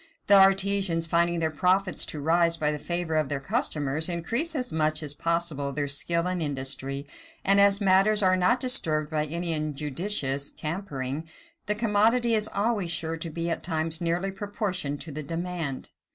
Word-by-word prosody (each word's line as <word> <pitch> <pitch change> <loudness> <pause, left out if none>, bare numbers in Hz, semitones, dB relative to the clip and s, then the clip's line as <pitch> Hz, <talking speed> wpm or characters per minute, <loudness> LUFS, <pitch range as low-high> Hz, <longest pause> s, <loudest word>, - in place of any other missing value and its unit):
The - - +3
artisans, 195 -3 +4
finding 170 +1 +1
their 160 -1 0
profits 185 +4 +1
to 150 - -4
rise 165 +2 +2
by 150 -1 0
the 150 - -4
favor 170 0 -2
of 155 -3 0
their 145 - -2
customers, 145 +3 0
increase 230 - 0
as 250 -3 -3
much 155 0 0
as 145 -1 0
possible 165 -3 -2
their 145 0 -2
skill 170 +4 +1
and 180 -1 -2
industry; 135 -1 -2 0.4
and 200 +1 +5
as 200 0 +4
matters 200 +2 +3
are 185 0 +4
not 185 +7 +2
disturbed 160 - +1
by 155 -1 -1
any 170 +2 -2
injudicious 150 -1 -1
tampering, 155 -3 -5 0.4
the 210 - +1
commodity 230 +2 +2
is 215 -1 +2
always 205 -3 -1
sure 165 -1 0
to 165 +1 -6
be 165 +2 -3
at 165 - -2
all - - -24
times 160 0 -2
nearly 175 +3 -1
proportioned 190 -7 -4
to 155 +2 -7
the 150 +2 -5
demand. 165 -2 -5
170 Hz, 175 wpm, -26 LUFS, 150-195 Hz, 0.4 s, and